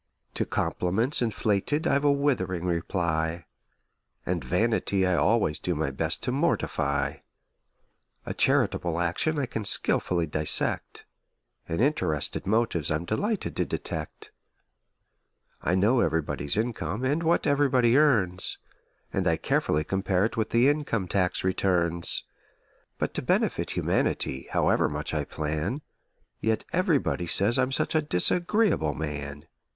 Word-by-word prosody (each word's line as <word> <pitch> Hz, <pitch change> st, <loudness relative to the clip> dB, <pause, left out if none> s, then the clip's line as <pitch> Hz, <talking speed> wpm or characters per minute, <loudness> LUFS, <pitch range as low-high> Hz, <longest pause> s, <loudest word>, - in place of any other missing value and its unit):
To -, -, -1 dB
compliments 110 Hz, +11 st, -1 dB
inflated 110 Hz, +5 st, 0 dB
I've 140 Hz, +1 st, +2 dB
a 145 Hz, -, +4 dB
withering 110 Hz, -12 st, 0 dB
reply; 85 Hz, -1 st, -1 dB, 0.8 s
And 85 Hz, -4 st, -2 dB
vanity 100 Hz, -, +1 dB
I 90 Hz, -, +2 dB
always 105 Hz, -7 st, +2 dB
do 90 Hz, -, -2 dB
my 75 Hz, -2 st, -1 dB
best 80 Hz, +5 st, -2 dB
to 125 Hz, -, -1 dB
mortify; 70 Hz, -, 0 dB, 1.1 s
A -, -, -4 dB
charitable 85 Hz, -1 st, +1 dB
action 90 Hz, -, 0 dB
I 140 Hz, -, 0 dB
can 115 Hz, -3 st, -4 dB
skilfully 90 Hz, -3 st, +2 dB
dissect: 75 Hz, 0 st, 0 dB, 0.6 s
And 80 Hz, -, -2 dB
interested 120 Hz, -, 0 dB
motives 110 Hz, -7 st, +1 dB
I'm 80 Hz, +2 st, -1 dB
delighted 205 Hz, -, -2 dB
to -, -, +2 dB
detect. 80 Hz, -1 st, -5 dB, 1.3 s
I 90 Hz, -, +1 dB
know 105 Hz, +7 st, +3 dB
everybody's 75 Hz, -4 st, 0 dB
income 115 Hz, 0 st, -2 dB
and 145 Hz, +5 st, +1 dB
what 170 Hz, +1 st, +1 dB
everybody 135 Hz, -5 st, +3 dB
earns, 105 Hz, -12 st, +2 dB, 0.6 s
And -, -, 0 dB
I -, -, +2 dB
carefully 75 Hz, +1 st, 0 dB
compare 95 Hz, +2 st, 0 dB
it 115 Hz, -, -3 dB
with 110 Hz, -1 st, -1 dB
the 120 Hz, +3 st, +4 dB
income 140 Hz, -10 st, 0 dB
tax 90 Hz, 0 st, 0 dB
returns; 90 Hz, -3 st, +1 dB, 0.7 s
But -, -, -2 dB
to -, -, -3 dB
benefit -, -, 0 dB
humanity, 65 Hz, 0 st, 0 dB
however -, -, +2 dB
much -, -, -4 dB
I -, -, -1 dB
plan, 80 Hz, -, -3 dB, 0.6 s
Yet 110 Hz, -1 st, -1 dB
everybody 165 Hz, -, +1 dB
says 105 Hz, +8 st, +2 dB
I'm 130 Hz, +1 st, +1 dB
such -, -, -1 dB
a 155 Hz, -, +3 dB
disagreeable 160 Hz, -, +1 dB
man! 75 Hz, -2 st, -5 dB
95 Hz, 130 wpm, -27 LUFS, 85-130 Hz, 1.3 s, a